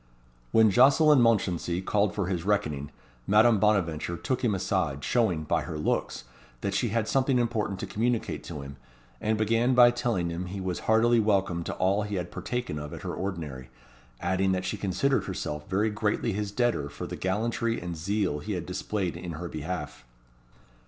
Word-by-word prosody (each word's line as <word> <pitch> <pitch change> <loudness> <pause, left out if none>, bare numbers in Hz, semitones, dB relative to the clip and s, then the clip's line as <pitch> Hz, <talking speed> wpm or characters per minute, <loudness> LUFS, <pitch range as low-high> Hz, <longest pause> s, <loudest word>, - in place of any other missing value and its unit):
When 110 -2 +5
Jocelyn 140 - +6
Mounchensey 95 -6 +1
called 100 +1 0
for 100 - 0
his 90 -2 -2
reckoning, 75 -9 -1 0.4
Madame 110 +2 +5
Bonaventure 85 -5 +1
took 130 +4 -2
him 110 -5 +2
aside, 85 -7 -1
showing, 95 -10 +1
by 75 - 0
her 80 - -5
looks, 75 - -1 0.4
that 100 - -2
she 100 +5 +1
had 110 0 -1
something 135 -1 +2
important 110 -5 -1
to - - -2
communicate 110 +5 -1
to 75 -4 -6
him, 70 -1 -9 0.4
and 110 0 +1
began 115 +4 +2
by 120 -1 +8
telling 120 -9 -1
him 90 +2 -4
he 95 +2 -5
was 95 -2 -3
heartily 115 +2 +5
welcome 100 -5 +1
to - - -4
all 95 +3 +2
he 105 0 -3
had 90 -2 -3
partaken 120 -11 -3
of 75 0 -7
at - - -10
her - - -3
ordinary, 75 -10 -5 0.5
adding 95 0 +1
that 95 0 -2
she 95 - -2
considered 105 +8 0
herself 75 +1 -5
very 105 +3 +1
greatly 105 +1 -1
his 105 0 -3
debtor 115 - 0
for - - -7
the - - -5
gallantry 115 +4 -1
and 85 0 -5
zeal 90 -1 -1
he 105 +8 -4
had 90 -3 -3
displayed 90 0 -3
in 85 -1 -6
her 85 +3 -5
behalf. 80 -3 -5
100 Hz, 180 wpm, -27 LUFS, 85-110 Hz, 0.5 s, by